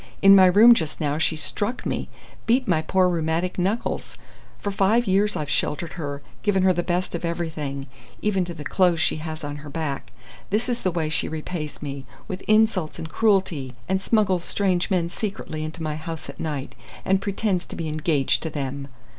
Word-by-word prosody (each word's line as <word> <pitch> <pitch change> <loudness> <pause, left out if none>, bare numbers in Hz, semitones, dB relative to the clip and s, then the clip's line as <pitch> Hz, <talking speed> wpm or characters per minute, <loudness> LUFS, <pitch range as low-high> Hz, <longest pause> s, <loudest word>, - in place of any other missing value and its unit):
In 195 0 +9
my 190 -1 +8
room 215 +6 +8
just 160 -9 -2
now 150 -1 0
she 160 0 +2
struck 205 - -2
me - - -2 0.4
beat 250 +2 +3
my 165 -4 +3
poor 185 +3 +3
rheumatic 170 +1 -1
knuckles! 200 +6 -1 0.4
For 205 - -3
five 205 +5 +3
years 200 +2 +2
I've 150 - -2
sheltered 155 +4 -1
her, 145 -4 -5 0.2
given 195 -3 +2
her 185 -1 +5
the 175 - 0
best 180 +1 -1
of 170 - -4
everything, 155 -5 -3 0.3
even 195 -3 +1
to 175 -1 -7
the 150 - -7
clothes 175 0 +2
she 160 - +1
has 155 0 -6
on 145 0 -4
her 145 0 -9
back. 145 -2 -4 0.4
This 215 +4 +1
is 245 -1 -1
the 185 - +1
way 165 -3 -1
she 155 - 0
repays 155 -1 -5
me 140 -2 -6 0.2
with 185 0 -5
insults 215 -7 +3
and 160 - -5
cruelty, 185 - +1
and 190 0 +1
smuggles 195 -4 +2
strange 185 -2 0
men 180 -4 +1
secretly 175 -5 -4
into 160 +2 -6
my 155 -1 -2
house 165 0 -6
at - - -20
night, 145 -4 -3 0.3
and 190 0 +2
pretends 200 -2 -1
to - - -7
be 165 - -3
engaged 155 -2 +1
to 160 - -3
them!" 140 -2 -4
175 Hz, 195 wpm, -24 LUFS, 155-195 Hz, 0.4 s, In